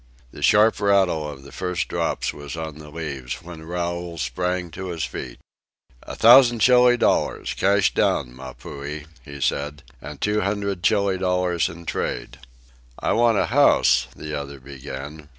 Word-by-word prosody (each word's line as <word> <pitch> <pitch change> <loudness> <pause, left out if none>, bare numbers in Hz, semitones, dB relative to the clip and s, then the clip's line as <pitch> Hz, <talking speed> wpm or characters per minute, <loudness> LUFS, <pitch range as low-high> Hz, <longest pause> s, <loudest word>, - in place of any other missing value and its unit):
The - - -11
sharp 110 +2 +4
rattle 95 -7 +2
of 70 -2 -10
the 70 - -13
first 90 -1 -3
drops - - -2
was 75 0 -8
on 80 -2 -6
the 75 -1 -11
leaves 75 -3 -6
when 85 -2 -10
Raoul 85 +1 -4
sprang 90 +1 -2
to 95 +3 -6
his 85 -3 -4
feet. - - -6 0.6
"A - - -8
thousand 120 +1 +7
Chili 125 +1 +5
dollars, - - 0
cash 100 0 +2
down, - - 0
Mapuhi," 70 +3 -8 0.2
he 70 +2 -10
said. 70 +2 -2 0.2
"And 75 -1 -9
two 105 0 +1
hundred 100 -1 -2
Chili 100 -1 +2
dollars 90 -4 +1
in 85 0 -11
trade." 65 -4 -4 0.6
"I - - -1
want 115 -1 +3
a - - +2
house 65 +1 +4
" - - -22
the 75 0 -7
other 70 -1 -5
began. 70 +3 -9
85 Hz, 160 wpm, -23 LUFS, 70-95 Hz, 0.6 s, thousand